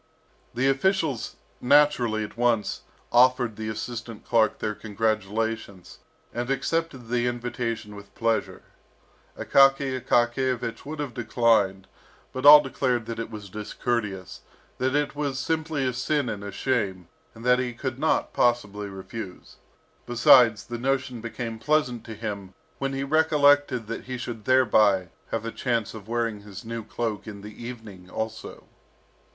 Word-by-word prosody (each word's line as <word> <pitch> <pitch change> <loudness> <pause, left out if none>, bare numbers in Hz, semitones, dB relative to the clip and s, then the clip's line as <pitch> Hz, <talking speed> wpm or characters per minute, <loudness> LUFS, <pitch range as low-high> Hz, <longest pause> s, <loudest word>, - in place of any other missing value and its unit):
The 130 +2 +2
officials 150 - 0 0.3
naturally 125 -5 +4
at 105 - -8
once 115 -3 +1 0.3
offered 125 -2 +4
the 110 0 -4
assistant 115 +1 -6
clerk 110 -3 +2
their 105 - -2
congratulations, 110 -2 -3 0.3
and 120 +1 -3
accepted 135 -2 -1
the 120 0 +1
invitation 120 -3 -3
with 100 0 -13
pleasure. 115 -1 -1 0.7
Akaky 135 -1 +3
Akakiyevich 120 0 0
would 155 +1 -5
have 145 -4 -4
declined; 110 -5 +2 0.5
but 130 +2 +1
all 150 0 +12
declared 130 -4 -1
that 115 0 -5
it 115 - -4
was 105 -3 -8
discourteous, 105 -2 -3 0.4
that 130 +2 +1
it 145 0 0
was 145 -2 -2
simply 155 0 -1
a 125 - 0
sin 145 +1 0
and 105 -2 -5
a 100 - -6
shame, 100 -7 -1 0.3
and 115 +2 -11
that 125 0 +5
he 125 -1 -1
could 130 +2 -5
not 160 +2 +1
possibly 105 -4 +1
refuse. 95 0 -9 0.5
Besides, 120 -2 +6
the 120 -1 -6
notion 130 -2 -1
became 115 -1 -5
pleasant 125 -3 +1
to 110 - -7
him 100 -3 -6 0.2
when 135 0 -2
he 135 0 -2
recollected 145 -4 +3
that 115 +2 -6
he 125 0 -4
should 115 -3 -6
thereby 105 -8 +4 0.2
have 115 0 -3
a 115 - -3
chance 115 -4 -1
of 110 -2 -10
wearing 115 -2 -1
his 100 0 -10
new 115 0 -5
cloak 110 -1 -4
in 100 -2 -8
the 105 +3 -10
evening 110 -7 -9
also. 110 +2 -5
120 Hz, 145 wpm, -26 LUFS, 110-130 Hz, 0.7 s, all